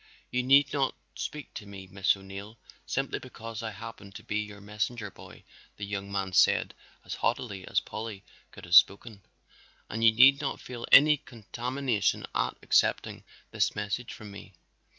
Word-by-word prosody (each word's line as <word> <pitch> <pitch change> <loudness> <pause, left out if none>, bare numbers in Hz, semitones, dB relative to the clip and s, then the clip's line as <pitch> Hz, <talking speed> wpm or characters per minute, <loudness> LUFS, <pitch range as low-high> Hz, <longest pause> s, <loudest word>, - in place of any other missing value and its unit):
"You 125 - +1
need 135 +3 +5
not 135 -2 0 0.2
speak 150 -3 -6
to 105 - -8
me, 100 -1 -9
Miss 95 +1 +1
O'Neill, 100 +3 -10 0.3
simply - - -2
because 115 0 -8
I 115 - -3
happen 110 -1 -10
to - - -10
be 105 - -2
your 105 -1 -6
messenger 105 +1 -4
boy," - - -14 0.3
the 100 - -5
young 100 0 -5
man 95 -1 -2
said - - +4 0.3
as - - -5
haughtily 110 -5 -2
as - - +2
Polly 110 -3 -7 0.3
could - - -12
have 85 - -7
spoken. 100 +4 +5 0.7
"And 115 +2 -3
you 115 - +8
need 135 +5 +6
not 140 - -3
feel 120 -2 -7
any 150 +2 +8
contamination 120 -1 -2
at - - -1
accepting - - +1 0.3
this - - 0
message 105 +4 -3
from 105 -2 -10
me. 100 -1 -12
105 Hz, 165 wpm, -28 LUFS, 100-120 Hz, 0.7 s, you